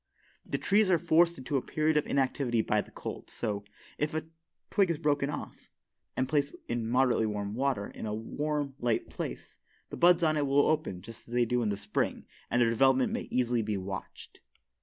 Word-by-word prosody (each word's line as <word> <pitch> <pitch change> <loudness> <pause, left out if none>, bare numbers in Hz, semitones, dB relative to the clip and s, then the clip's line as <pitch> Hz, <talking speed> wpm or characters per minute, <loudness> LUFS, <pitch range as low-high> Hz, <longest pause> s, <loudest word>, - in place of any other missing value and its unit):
The - - -2
trees 205 0 +3
are 180 - +5
forced 170 +1 +3
into 135 +2 -1
a - - 0
period 155 +3 0
of 150 - +2
inactivity 130 -4 +1
by 105 0 +2
the - - -14
cold, - - -7
so, 105 -3 -3 0.4
if 150 +1 -1
a 160 - -2 0.5
twig 195 -4 +3
is 165 - 0
broken 145 -2 +1
off, 145 - -7 0.5
and 130 - +1
placed 145 -1 0
in 120 -1 -2
moderately 125 -2 +3
warm 105 -1 -3
water, 130 -4 0
in - - -7
a 105 - -2
warm, 145 +5 -2
light 120 -2 0
place, - - -6 0.3
the - - -5
buds 175 0 +5
on 155 -1 +3
it 145 -1 +1
will 140 +1 +4
open 150 - 0
just 115 +2 -11
as 120 - -6
they 120 -1 +4
do 125 +1 +1
in 110 - +1
the 100 - -1
spring - - -2 0.2
and 120 - +2
their 115 - +3
development 130 +2 +3
may - - -1
be - - -3
easily 115 -4 +1
watched. 95 0 -7
130 Hz, 200 wpm, -30 LUFS, 115-150 Hz, 0.5 s, are